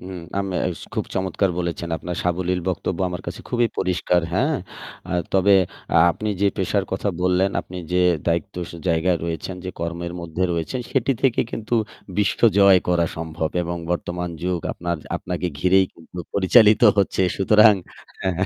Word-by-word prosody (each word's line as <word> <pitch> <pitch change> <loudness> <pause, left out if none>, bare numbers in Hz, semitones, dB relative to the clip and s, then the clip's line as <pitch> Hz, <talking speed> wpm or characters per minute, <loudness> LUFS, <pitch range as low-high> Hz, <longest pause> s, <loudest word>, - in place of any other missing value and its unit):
হুম, 90 0 -7 0.2
আমে 95 -2 -2 0.2
ইস 80 - -11
খুব - - -1
চমৎকার 95 +1 0
বলেছেন। 85 -1 -3
আপনার 90 +2 -5
সাবলীল 90 +1 0
বক্তব্য 90 -1 -2
আমার 90 0 -6
কাছে - - -6
খুবই 120 -1 +2
পরিষ্কার। 90 -1 +1
হ্যাঁ? 140 - +1 0.5
আ - - -7 0.2
তবে 100 +1 +4 0.4
আ - - +6 0.2
আপনি 110 +6 -4
যে 100 - +4
পেশার 95 +1 0
কথা 95 +2 -1
বললেন, 90 +1 +2
আপনি 90 - -11 0.2
যে 90 - +3 0.3
দায়িত্ব 85 +4 0 0.2
সে - - -9
জায়গা 85 +2 +2
রয়েছেন, 85 +2 -4
যে 95 - -3
কর্মের 85 +1 -4
মধ্যে 85 +1 -4
রয়েছেন 85 +9 -2
সেটি 135 - +2
থেকে 130 -3 +3
কিন্তু 115 +2 -3 0.4
বিশ্বজয় 100 -2 +5
করা 85 -1 +2
সম্ভব 80 0 -3
এবং 85 0 -3
বর্তমান 90 0 -2
যুগ 90 -1 -1
আপনার, 85 0 -3 0.2
আপনাকে 90 0 -3
ঘিরেই 95 +4 +4
কিন্তু 85 +2 -13 0.2
পরিচালিত 105 +3 +5 0.2
হচ্ছে। 95 -1 +2
সুতরাং 105 +2 +6 0.5
হ্যাঁ। 95 -1 0
90 Hz, 160 wpm, -22 LUFS, 85-100 Hz, 0.5 s, আ